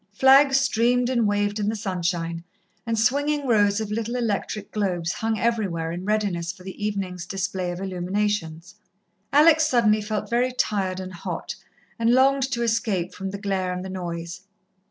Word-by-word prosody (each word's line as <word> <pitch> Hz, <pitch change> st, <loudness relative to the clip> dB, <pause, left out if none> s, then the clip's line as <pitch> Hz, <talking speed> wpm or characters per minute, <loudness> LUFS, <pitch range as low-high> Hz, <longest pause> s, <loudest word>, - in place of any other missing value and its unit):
Flags 270 Hz, +4 st, +6 dB
streamed 245 Hz, -1 st, +2 dB
and 235 Hz, -4 st, +2 dB
waved 205 Hz, +1 st, 0 dB
in 205 Hz, 0 st, 0 dB
the 220 Hz, -, -2 dB
sunshine, 175 Hz, -4 st, -2 dB, 0.4 s
and 230 Hz, -1 st, 0 dB
swinging 285 Hz, +5 st, +1 dB
rows 205 Hz, -3 st, +3 dB
of 215 Hz, -1 st, -4 dB
little 230 Hz, +2 st, -2 dB
electric 215 Hz, -3 st, -2 dB
globes 180 Hz, -5 st, -1 dB
hung 225 Hz, +2 st, -2 dB
everywhere, 195 Hz, -9 st, -1 dB
in 175 Hz, +2 st, -5 dB
readiness 200 Hz, -5 st, 0 dB
for 185 Hz, -, -16 dB
the 190 Hz, +2 st, -8 dB
evening's 185 Hz, -4 st, -3 dB
display 190 Hz, -1 st, -2 dB
of 175 Hz, 0 st, -5 dB
illuminations. 185 Hz, -2 st, -2 dB, 0.6 s
Alex 315 Hz, +2 st, +6 dB
suddenly 215 Hz, -6 st, +3 dB
felt 210 Hz, 0 st, -3 dB
very 245 Hz, +2 st, +1 dB
tired 190 Hz, -6 st, -1 dB
and 185 Hz, 0 st, -7 dB
hot, 175 Hz, -, -5 dB, 0.5 s
and 230 Hz, +1 st, +3 dB
longed 270 Hz, +1 st, +4 dB
to 235 Hz, -1 st, -1 dB
escape 215 Hz, -6 st, 0 dB
from 195 Hz, -1 st, -5 dB
the 200 Hz, -, -5 dB
glare 195 Hz, -2 st, -2 dB
and 180 Hz, +1 st, -4 dB
the -, -, -6 dB
noise. 170 Hz, -2 st, -5 dB
205 Hz, 165 wpm, -24 LUFS, 185-230 Hz, 0.6 s, Flags